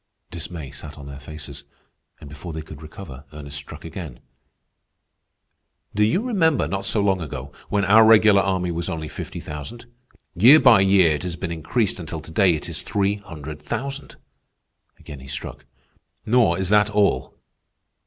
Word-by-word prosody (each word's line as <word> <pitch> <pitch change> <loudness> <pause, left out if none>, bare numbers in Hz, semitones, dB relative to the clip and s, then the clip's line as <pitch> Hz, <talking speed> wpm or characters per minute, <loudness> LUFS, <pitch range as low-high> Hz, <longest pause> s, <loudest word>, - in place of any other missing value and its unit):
Dismay 80 -4 -6
sat 75 +2 -9
on 70 - -10
their 70 0 -9
faces, 70 -1 -9 0.6
and - - -11
before 75 +4 -8
they 80 0 -5
could 80 -1 -11
recover, 75 -3 -10
Ernest 70 -2 -7
struck 75 - -9
again. 80 -7 -8 1.7
"Do 105 - +2
you 110 - +2
remember, 165 - +2
not 100 0 -3
so 105 - +1
long 95 -2 +1
ago, 70 -3 -6 0.2
when 100 -1 +1
our 110 +4 +7
regular 110 -2 +6
army 95 -2 -1
was 85 0 -3
only 80 -1 -4
fifty - - -7
thousand? 75 +12 -8 0.5
Year 120 - +8
by 120 -8 +7
year 95 -3 +5
it 75 - -3
has 90 -2 -4
been 85 0 -5
increased 95 +6 -1
until 80 -1 -6
to 80 - -12
day 90 0 +4
it 75 - -6
is - - -2
three 100 0 0
hundred 80 -6 -9
thousand." 140 - -5 0.8
Again 75 - -10
he 65 - -12
struck. 70 0 -6 0.6
"Nor 120 +1 +3
is 95 -1 -2
that 105 0 +4
all. 105 -1 +1
85 Hz, 165 wpm, -23 LUFS, 75-105 Hz, 1.7 s, Year